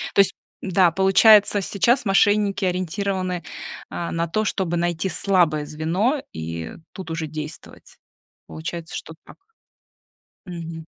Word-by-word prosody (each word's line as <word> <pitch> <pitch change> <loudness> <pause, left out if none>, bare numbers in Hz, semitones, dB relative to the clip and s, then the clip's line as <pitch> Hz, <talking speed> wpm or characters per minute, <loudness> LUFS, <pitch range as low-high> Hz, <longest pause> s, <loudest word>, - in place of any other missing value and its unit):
То - - +3
есть 195 - +3 0.3
да, 185 -2 +3
получается, 205 +3 +5
сейчас 235 +7 +1
мошенники 205 0 +3
ориентированы, 185 0 -2 0.5
э, 170 - -4
на 165 0 -1
то, 215 +6 -1
чтобы 180 -4 -1
найти 175 +2 -1
слабое 170 -4 +2
звено, 180 - -1
и 80 +1 -6 0.2
тут 180 -4 -8
уже 160 -1 -3
действовать. 155 +1 -9 0.5
Получается, 160 +1 -6
что 160 - -7
так. - - -14 1.1
Мгм. 165 -2 -7
180 Hz, 120 wpm, -22 LUFS, 160-195 Hz, 1.1 s, получается